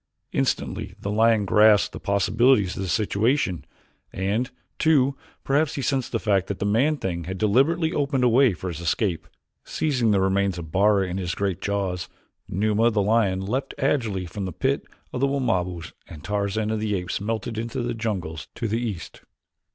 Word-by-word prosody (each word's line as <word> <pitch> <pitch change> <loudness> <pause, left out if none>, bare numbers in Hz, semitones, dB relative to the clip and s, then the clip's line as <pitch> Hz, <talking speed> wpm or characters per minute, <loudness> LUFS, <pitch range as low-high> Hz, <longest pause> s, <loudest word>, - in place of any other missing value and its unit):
Instantly - - -2
the 100 - -3
lion 110 -1 +3
grasped 105 +1 +5
the - - -6
possibilities 105 +1 +2
of - - -4
the 95 - -3
situation, 105 - +1 0.5
and, 105 +7 -1 0.3
too, 140 -4 +3 0.3
perhaps 145 +2 +1
he 140 - -3
sensed 135 -2 -1
the 115 - +1
fact 100 -4 +1
that 100 - -3
the 100 - -2
man 130 +9 +2
thing 85 - -3
had 95 +2 -5
deliberately 145 - +2
opened 140 -4 0
a - - +5
way 125 +1 +5
for 90 +2 -5
his 85 -3 -6
escape. 85 -1 -1 0.4
Seizing 130 -7 0
the 100 -2 +3
remains 95 -1 +1
of 80 -2 -7
Bara 100 +1 +3
in 90 +1 -4
his 85 -2 -3
great 95 -3 -2
jaws, 95 -3 -2 0.4
Numa, 105 +4 +2
the 110 -2 0
lion, 100 -3 +2
leaped 130 +6 -2
agilely 115 -9 0
from 95 +3 -5
the 95 - -4
pit 80 - -1 0.3
of - - -2
the 140 - +4
Wamabos 90 - -1
and 75 -3 -11
Tarzan 105 +1 -1
of 110 - -1
the 105 -1 -1
Apes 90 +1 -3
melted 110 +1 -3
into 115 +1 -3
the 120 0 -2
jungles 95 -10 -4
to 115 - -2
the 115 +3 -1
east. 105 -9 -5
105 Hz, 180 wpm, -24 LUFS, 95-120 Hz, 0.5 s, grasped